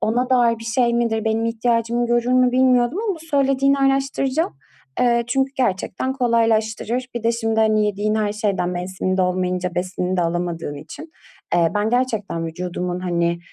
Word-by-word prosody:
ona 245 +4 0
dair 235 -3 +3
bir 225 - -10
şey 235 +1 +1
midir, 230 -2 0
benim 220 +1 0
ihtiyacımı 230 +1 0
görür 240 +1 +1
mü 255 -1 +4
bilmiyordum 255 +4 +3
ama 390 - +1
bu - - -11
söylediğini 275 -2 +2
araştıracağım. 270 - 0 0.4
Eee, 235 -1 +3
çünkü 270 +2 0
gerçekten 250 +2 -1
kolaylaştırır. 230 -1 0
Bir 235 - -4
de 230 - +2
şimdi, 225 -1 0
hani, 215 -1 +3
yediğin 210 +1 -1
her 210 -1 0
şeyden 200 -4 -1
mevsiminde 185 +1 -2
olmayınca 180 -1 -1
besinini 180 0 -2
de 175 - +3
alamadığın 170 -2 -2
için, 160 - -10 0.4
eee, 170 -2 +3
ben 210 +1 0
gerçekten 220 -9 -1
vücudumun 180 +1 -4
hani, 170 -1 0
225 Hz, 160 wpm, -21 LUFS, 185-250 Hz, 0.4 s, mü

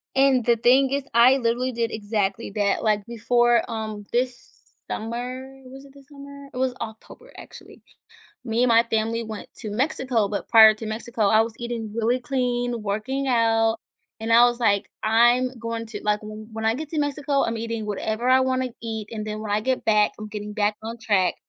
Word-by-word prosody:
And 265 -2 +4
the 235 -1 +3
thing 260 +4 +4
is, 280 0 -1
I 245 +3 +6
literally 245 +1 0
did 230 -1 -2
exactly 210 0 -2
that, 205 -2 0
like, 210 -2 +1
before, 240 0 +2
um, 215 -2 -5
this 245 0 -2 0.4
summer, 255 +4 -5
was 270 +2 -12
it 275 - -17
this 280 -1 -18
summer? 280 -1 -11
It - - -8
was 260 0 0
October, 225 - -9
actually. - - -13 0.6
Me 230 0 +1
and 250 - +3
my 230 0 +5
family 225 +1 0
went 220 -2 -8
to 215 - -6
Mexico, 250 -3 0
but 205 - -4
prior 220 -2 +8
to 220 - -8
Mexico, 220 0 -2
I 220 +2 +5
was 225 0 -3
eating 235 -3 -5
really 230 +3 0
clean, 245 -2 -1
working 215 +7 -2
out, 225 -2 +2 0.4
and 225 +1 -2
I 235 +1 +7
was 240 0 +1
like, 205 -4 +1
"I'm 240 +3 +4
going 230 0 -4
to, 215 -2 -7
like, 210 0 +1
when 215 +1 -8
I 225 +1 +2
get 305 +3 -6
to 315 - -1
Mexico, 285 -1 0
I'm 230 0 -2
eating 230 -1 -4
whatever 220 +3 -2
I 260 0 +6
wanna 260 0 0
eat, 220 -2 -5
and 215 -1 -5
then 215 0 -4
when 215 -1 -5
I 205 - +2
get 255 +4 -1
back, 210 -1 +3
I'm 215 0 -8
getting 210 0 -6
back 210 0 0
on 225 +2 -6
track." 205 -6 +1
230 Hz, 195 wpm, -24 LUFS, 215-255 Hz, 0.6 s, prior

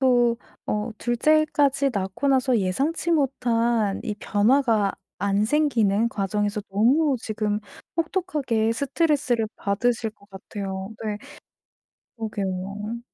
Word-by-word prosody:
또 245 -3 +4 0.3
어 210 +2 -1
둘째까지 285 +2 +2
낳고 195 +6 -1
나서 260 -2 +3
예상치 275 - 0
못한 235 -8 +1
이 210 - -2
변화가 215 0 +2 0.3
안 200 +1 +1
생기는 230 -7 +2
과정에서 205 +1 -1
너무 260 +8 +3
지금 215 -2 -1 0.4
혹독하게 305 - 0
스트레스를 270 -3 +1
받으실 225 +3 0
것 205 -1 -24
같아요. 190 0 -6
네. 210 -1 -2 1.0
그러게요. 205 0 -4
230 Hz, 240 characters per minute, -24 LUFS, 205-270 Hz, 1.0 s, 또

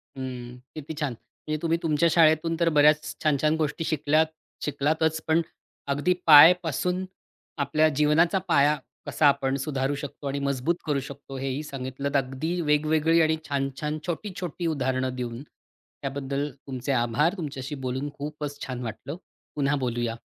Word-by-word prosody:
हं. 125 -2 -6 0.2
किती 155 0 -6
छान. 145 -5 -1 0.3
म्हणजे 155 0 -1
तुम्ही 165 0 +1
तुमच्या 165 +1 +3
शाळेतून 165 0 +4
तर, 170 -1 +3
बऱ्याच 150 0 +3
छान-छान 155 +1 +2
गोष्टी 155 +1 -1
शिकल्यात-शिकलातचं 155 0 0
पण 160 +1 +3 0.5
अगदी 145 +6 +1
पायपासून 175 +3 +6 0.5
आपल्या 150 +2 +2
जीवनाचा 150 +5 +3
पाया, 145 +2 +4 0.3
कसा 150 - +3
आपण 135 -1 +2
सुधारू 135 0 -1
शकतो 145 0 -7
आणि 140 +1 -2
मजबूत 140 +5 0
करू 145 -3 +1
शकतो 140 0 -9
हे 135 +1 -3
ही 135 +3 -2
सांगितलत. 140 0 -5
अगदी 140 +6 -2
वेगवेगळी 155 +2 +3
आणि 160 0 +2
छान-छान, 140 +2 -2
छोटी-छोटी 175 -1 -4
उदाहरणं 130 -4 -1
देऊन. 120 -1 -5 0.6
त्याबद्दल 140 +1 -3 0.2
तुमचे 130 +1 -3
आभार 120 +7 +2
तुमच्याशी 145 -3 -5
बोलून 130 +3 -2
खूपच 145 0 -6
छान 125 -1 -5
वाटलं. 115 +6 -6 0.4
पुन्हा 145 -1 +1
बोलूया. 120 -1 -2
145 Hz, 135 wpm, -26 LUFS, 135-160 Hz, 0.6 s, पायपासून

